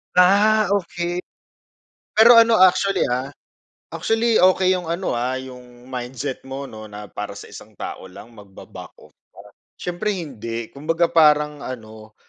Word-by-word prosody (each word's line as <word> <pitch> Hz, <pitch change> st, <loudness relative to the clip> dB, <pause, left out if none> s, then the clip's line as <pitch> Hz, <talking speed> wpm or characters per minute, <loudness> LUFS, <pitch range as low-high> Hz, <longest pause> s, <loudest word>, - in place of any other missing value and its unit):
Ah, 200 Hz, +3 st, +4 dB
okey. 175 Hz, -2 st, -2 dB, 1.0 s
Pero 230 Hz, +2 st, +8 dB
ano 230 Hz, 0 st, +6 dB
actually, 185 Hz, 0 st, +3 dB
ah, 130 Hz, +3 st, -3 dB, 0.6 s
actually, 225 Hz, -1 st, +1 dB
okey 185 Hz, 0 st, +4 dB
yung 180 Hz, -3 st, -4 dB
ano, 175 Hz, +3 st, -2 dB
ah, 125 Hz, +2 st, -2 dB
yung 125 Hz, -2 st, -12 dB
mindset 130 Hz, +1 st, -6 dB
mo 135 Hz, +1 st, -5 dB
'no, 110 Hz, -4 st, -11 dB
na 105 Hz, 0 st, -9 dB
para 105 Hz, 0 st, -7 dB
sa -, -, -10 dB
isang 105 Hz, -1 st, -14 dB
tao 95 Hz, -, -7 dB
lang 115 Hz, +6 st, -14 dB
magba-back 100 Hz, -3 st, -13 dB
off -, -, -19 dB
ka? -, -, -68 dB, 0.6 s
Siyempre 180 Hz, +4 st, -2 dB
hindi 115 Hz, -, -6 dB
kumbaga 165 Hz, +4 st, -1 dB
parang 150 Hz, -2 st, +3 dB
ano 110 Hz, -3 st, -10 dB
150 Hz, 140 wpm, -21 LUFS, 120-185 Hz, 1.0 s, Pero